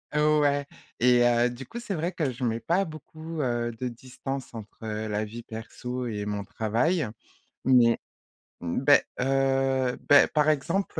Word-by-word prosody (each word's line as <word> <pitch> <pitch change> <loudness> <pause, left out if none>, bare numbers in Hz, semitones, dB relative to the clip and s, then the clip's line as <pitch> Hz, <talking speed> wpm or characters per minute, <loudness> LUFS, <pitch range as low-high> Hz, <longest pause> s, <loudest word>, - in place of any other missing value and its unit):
Ouais 150 -2 +3 0.4
et 125 0 +5
heu, 120 0 +3
du 125 +2 -8
coup, 235 - -7
c'est 215 - -4
vrai 170 +1 -1
que 155 -6 -1
je 125 +1 -7
mets 115 -1 0
pas 175 - +1
beaucoup, 155 +1 -7
heu, 120 -2 -1
de 125 - -2
distance 130 +2 -7
entre 110 -2 -9
heu, 110 0 -3
la 105 +1 -1
vie 115 +3 -8
perso 125 +3 -6
et 105 -3 -3
mon 105 -1 -3
travail. 120 - 0 0.6
Mais, 120 -3 +5 0.6
beh, 135 +12 +4 0.2
heu, 135 -1 +1
beh 145 - +8
par 150 0 +2
exemple, 165 +4 0
130 Hz, 160 wpm, -27 LUFS, 115-150 Hz, 0.6 s, beh